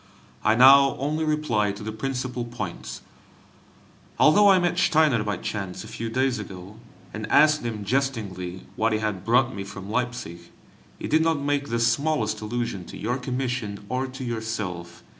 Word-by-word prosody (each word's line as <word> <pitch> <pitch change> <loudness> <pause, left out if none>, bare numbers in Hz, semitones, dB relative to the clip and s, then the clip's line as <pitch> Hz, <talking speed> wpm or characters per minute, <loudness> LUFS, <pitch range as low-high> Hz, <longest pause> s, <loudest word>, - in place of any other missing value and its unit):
I 110 +1 +4
now 135 +2 +7
only 150 +4 -1
reply 150 -10 +1
to 105 +2 -9
the 110 - -4
principal 125 +2 -3
points. 115 -7 -6 1.1
Although 200 +7 +6
I 190 - +7
met 175 0 +1
Steiner 155 -10 +3
by 105 -1 -2
chance 95 -3 -5
a - - -10
few 115 +1 -5
days 130 0 0
ago, 95 0 -9 0.4
and 110 -1 -5
asked 150 +1 +5
him 110 -3 -4
jestingly 100 -8 -2
what 110 0 +1
he - - +2
had 105 -4 -3
brought 120 +4 +3
me 100 - -5
from 100 0 -8
Leipzig, 120 -9 -3 0.6
he - - -5
did 155 +2 +3
not 165 -1 +2
make 145 0 -1
the 115 - 0
smallest 115 -2 +1
allusion 115 -3 -3
to - - -10
your 120 +4 -2
commission 125 -5 -3
or 130 +2 -1
to 130 +1 -8
yourself. 105 -8 -5
120 Hz, 165 wpm, -25 LUFS, 105-135 Hz, 1.1 s, now